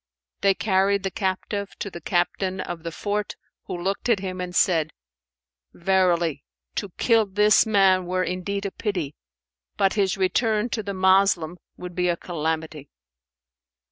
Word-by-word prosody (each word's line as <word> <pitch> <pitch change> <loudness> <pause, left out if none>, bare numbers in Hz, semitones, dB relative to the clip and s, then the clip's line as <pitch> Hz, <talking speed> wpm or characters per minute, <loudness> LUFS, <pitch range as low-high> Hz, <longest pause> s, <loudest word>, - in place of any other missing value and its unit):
They 195 -1 +3
carried 200 -1 +2
the 195 - -2
captive 200 0 -3
to 200 - -5
the 170 - -8
Captain 185 +1 0
of 175 -2 -5
the 165 0 -5
fort, 205 +4 -3 0.3
who - - -5
looked 195 +6 -2
at 230 - +4
him 185 -1 -5
and 180 -1 -5
said, 165 -3 +2 0.8
"Verily, 175 -5 +1 0.3
to 205 - -3
kill 225 -3 +3
this 210 +2 +4
man 190 -4 +4
were 185 +1 0
indeed 190 +3 -3
a 200 - -2
pity; 180 -11 -3 0.6
but 195 - +3
his 195 -1 +1
return 215 +4 +1
to 225 - -2
the 200 -1 -5
Moslem 190 -3 +3 0.2
would 180 0 -7
be 180 0 0
a 170 - +1
calamity." 160 -3 -4
190 Hz, 150 wpm, -24 LUFS, 175-200 Hz, 0.8 s, at